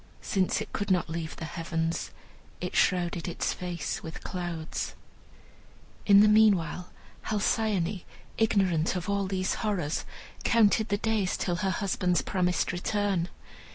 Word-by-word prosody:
Since 190 Hz, -2 st, +1 dB
it -, -, -7 dB
could 200 Hz, -, -2 dB
not 180 Hz, -3 st, +1 dB
leave 160 Hz, -1 st, -4 dB
the 160 Hz, -, -6 dB
heavens, 165 Hz, +1 st, -2 dB, 0.5 s
it -, -, -4 dB
shrouded 175 Hz, -2 st, +1 dB
its 175 Hz, -, -1 dB
face 175 Hz, -2 st, -4 dB
with 160 Hz, -1 st, -8 dB
clouds. 170 Hz, -3 st, -4 dB, 1.1 s
In 200 Hz, -1 st, +8 dB
the 210 Hz, -, +7 dB
meanwhile 200 Hz, -5 st, +3 dB, 0.4 s
Halcyone, 210 Hz, -3 st, 0 dB, 0.3 s
ignorant 190 Hz, -7 st, +2 dB
of 180 Hz, -3 st, -3 dB
all 200 Hz, -1 st, 0 dB
these 185 Hz, -1 st, 0 dB
horrors, 190 Hz, -9 st, -1 dB, 0.4 s
counted 220 Hz, -1 st, +4 dB
the 205 Hz, -, +1 dB
days 215 Hz, -3 st, 0 dB
till 175 Hz, -2 st, -1 dB
her 195 Hz, 0 st, 0 dB
husband's 185 Hz, -1 st, 0 dB
promised 180 Hz, -2 st, 0 dB
return. 185 Hz, -1 st, 0 dB
185 Hz, 130 wpm, -28 LUFS, 170-205 Hz, 1.1 s, In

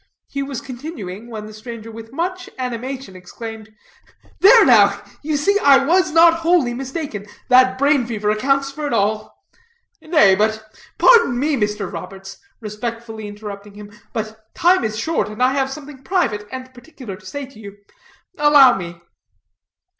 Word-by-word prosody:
He 275 Hz, -, -4 dB
was 275 Hz, -3 st, -5 dB
continuing, 240 Hz, -, -8 dB
when 215 Hz, -2 st, -7 dB
the 215 Hz, -, -11 dB
stranger 225 Hz, 0 st, -9 dB
with 225 Hz, 0 st, -11 dB
much 360 Hz, +6 st, -4 dB
animation 255 Hz, -3 st, -5 dB
exclaimed: 220 Hz, +4 st, -9 dB, 0.7 s
"There 450 Hz, +4 st, +7 dB
now, -, -, +5 dB, 0.2 s
you 300 Hz, 0 st, -1 dB
see, 400 Hz, +8 st, +2 dB
I 275 Hz, -4 st, +5 dB
was 355 Hz, +2 st, +2 dB
not 330 Hz, +1 st, +5 dB
wholly 330 Hz, -7 st, +2 dB
mistaken. 265 Hz, -5 st, -6 dB, 0.2 s
That 255 Hz, 0 st, +5 dB
brain 280 Hz, -3 st, +2 dB
fever 210 Hz, -3 st, -1 dB
accounts 275 Hz, +5 st, 0 dB
for 295 Hz, +1 st, -5 dB
it -, -, -3 dB
all." 210 Hz, +1 st, -1 dB, 0.6 s
"Nay; 305 Hz, -, +4 dB
but 220 Hz, +2 st, 0 dB, 0.2 s
" -, -, -26 dB
"Pardon 465 Hz, -, +5 dB
me, 290 Hz, +3 st, 0 dB
Mr. 210 Hz, -3 st, -2 dB
Roberts," 195 Hz, 0 st, -9 dB, 0.2 s
respectfully 220 Hz, 0 st, -6 dB
interrupting 205 Hz, -1 st, -9 dB
him, 205 Hz, 0 st, -11 dB, 0.2 s
"but 220 Hz, 0 st, -6 dB
time 355 Hz, -3 st, +3 dB
is 215 Hz, -1 st, -3 dB
short, 225 Hz, -4 st, -1 dB
and 215 Hz, +4 st, -3 dB
I 255 Hz, -, +4 dB
have 270 Hz, -1 st, 0 dB
something 280 Hz, -1 st, -10 dB
private 230 Hz, -, -1 dB
and 260 Hz, 0 st, -8 dB
particular 245 Hz, -5 st, -10 dB
to 190 Hz, 0 st, -18 dB
say 285 Hz, +6 st, -6 dB
to 260 Hz, -4 st, -17 dB
you. 200 Hz, -1 st, -11 dB, 0.6 s
Allow 290 Hz, -5 st, +6 dB
me." 170 Hz, -2 st, -8 dB
245 Hz, 160 wpm, -19 LUFS, 215-285 Hz, 0.7 s, There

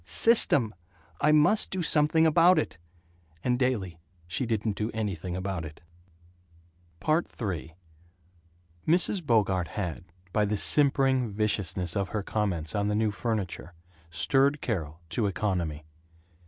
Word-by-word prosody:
System. 145 Hz, -, +4 dB, 0.5 s
I 150 Hz, -, +4 dB
must 155 Hz, +8 st, +4 dB
do 185 Hz, -2 st, -3 dB
something 160 Hz, +1 st, +3 dB
about 170 Hz, +3 st, +5 dB
it." 80 Hz, -, -2 dB, 0.6 s
And 125 Hz, -1 st, 0 dB
daily 100 Hz, -10 st, -2 dB, 0.3 s
she 115 Hz, +9 st, -3 dB
didn't 110 Hz, -2 st, -2 dB
do 105 Hz, +2 st, -3 dB
anything 95 Hz, -5 st, -4 dB
about 95 Hz, -2 st, -4 dB
it. 80 Hz, -1 st, -10 dB, 1.3 s
III 105 Hz, -, -2 dB, 1.1 s
Mrs. 180 Hz, +2 st, +3 dB
Bogart 100 Hz, -, +1 dB
had, 90 Hz, -1 st, -5 dB, 0.3 s
by 105 Hz, -, +2 dB
the 105 Hz, +1 st, -1 dB
simpering 135 Hz, -1 st, +3 dB
viciousness 100 Hz, -4 st, 0 dB
of 100 Hz, -2 st, -2 dB
her 105 Hz, -2 st, -3 dB
comments 95 Hz, -8 st, -2 dB
on 100 Hz, -1 st, -1 dB
the 105 Hz, -, -1 dB
new 110 Hz, 0 st, +1 dB
furniture, 100 Hz, -5 st, -4 dB, 0.3 s
stirred 135 Hz, -, +2 dB
Carol 80 Hz, -, -4 dB
to 100 Hz, +6 st, -1 dB
economy. 85 Hz, -6 st, -3 dB
105 Hz, 125 wpm, -27 LUFS, 90-135 Hz, 1.3 s, about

